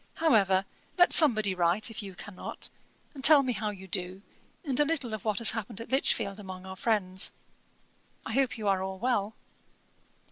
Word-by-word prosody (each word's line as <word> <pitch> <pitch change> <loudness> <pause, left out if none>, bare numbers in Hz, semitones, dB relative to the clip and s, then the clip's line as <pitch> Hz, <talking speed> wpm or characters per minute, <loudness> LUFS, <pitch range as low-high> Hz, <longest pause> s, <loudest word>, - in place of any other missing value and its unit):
However, 195 - +2 0.3
let 355 0 +5
somebody 215 - +5
write, 180 +5 +3
if 225 - -7
you 195 -2 -10
cannot, 190 0 -7 0.4
and 270 -3 -11
tell 290 -1 +8
me 255 -2 -1
how 215 -2 -3
you 190 -2 -9
do, 185 +1 -4 0.4
and 270 -3 -2
a - - +5
little 285 -7 -3
of 215 - -6
what 215 -3 -1
has 230 - +4
happened 225 -1 -6
at 230 - -10
Lichfield 220 -6 0
among 185 -2 -9
our 190 0 -8
friends. 190 -3 -1 0.9
I 220 - -5
hope 265 -1 0
you 215 -2 -4
are 195 -1 +1
all 190 0 -5
well. 220 -2 -1
210 Hz, 180 wpm, -28 LUFS, 190-245 Hz, 0.9 s, tell